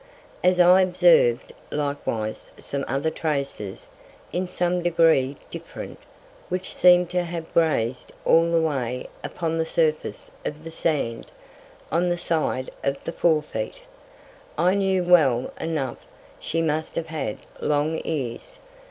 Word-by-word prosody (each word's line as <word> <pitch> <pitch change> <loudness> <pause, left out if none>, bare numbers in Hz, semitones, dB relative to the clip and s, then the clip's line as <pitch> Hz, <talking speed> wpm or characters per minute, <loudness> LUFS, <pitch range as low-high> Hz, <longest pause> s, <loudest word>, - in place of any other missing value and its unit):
As 180 0 +4
I 180 +2 +7
observ'd 480 - +4 0.2
likewise 140 -7 -3
some 140 0 -4
other 140 +5 0
Traces, 140 -12 -3 0.5
in 180 +1 -1
some 180 0 0
Degree 165 -6 +3 0.2
different, - - -8 0.5
which 185 +1 -3
seem'd 180 -1 +5
to 180 0 +1
have 170 -1 -6
graz'd 130 -7 +1
all 165 +1 +4
the 165 - +4
Way 130 -6 -2
upon 165 -1 -2
the - - +3
Surface 155 -2 -1
of 150 +1 -5
the 165 - -7
Sand, 145 -8 -2 0.6
on 175 +3 +2
the 175 - 0
Side 155 -6 -1
of 140 0 -1
the - - -3
fore 160 -3 +2
Feet, - - -5 0.7
I 180 - +3
knew 190 -2 +1
well 150 -9 +4
enough 145 -7 -2 0.4
she 165 +1 -1
must 155 0 -1
have 165 - -1
had 155 -9 -3 0.2
long 150 +2 0
Ears. 150 - -4
160 Hz, 135 wpm, -24 LUFS, 140-175 Hz, 0.7 s, I